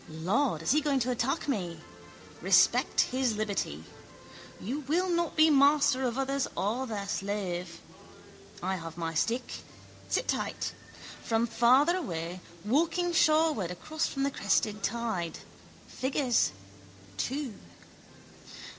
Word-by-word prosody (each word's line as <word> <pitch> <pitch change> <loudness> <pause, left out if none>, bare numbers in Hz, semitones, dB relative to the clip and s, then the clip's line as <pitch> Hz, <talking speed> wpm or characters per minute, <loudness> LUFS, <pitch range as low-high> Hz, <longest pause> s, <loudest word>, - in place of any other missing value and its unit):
Lord, 165 - 0
is 160 - +1
he 305 +3 +4
going 285 -3 +1
to 250 +2 0
attack 260 +6 -1
me? 180 - -2 0.6
Respect - - +4
his 255 -3 0
liberty. 200 - -2 0.8
You 250 +9 -3
will 320 +6 0
not 340 -2 0
be 315 0 +6
master 285 -1 +4
of 240 +1 -3
others 270 0 0
or 235 +7 -1
their 205 -3 -4
slave. 185 -4 -3 0.8
I 190 +1 -1
have 165 -1 -8
my 165 -1 -3
stick. 235 +10 -1 0.5
Sit - - 0
tight. - - -2 0.5
From 225 0 +1
farther 245 +8 +4
away, 175 - -4 0.2
walking 335 +8 +1
shoreward 310 - +3
across 310 - -3
from 275 - -3
the 280 - +1
crested 210 -5 0
tide, 220 -7 -2 0.5
figures, 260 -2 +1 0.7
two. 265 - -2
240 Hz, 120 wpm, -29 LUFS, 190-285 Hz, 0.8 s, be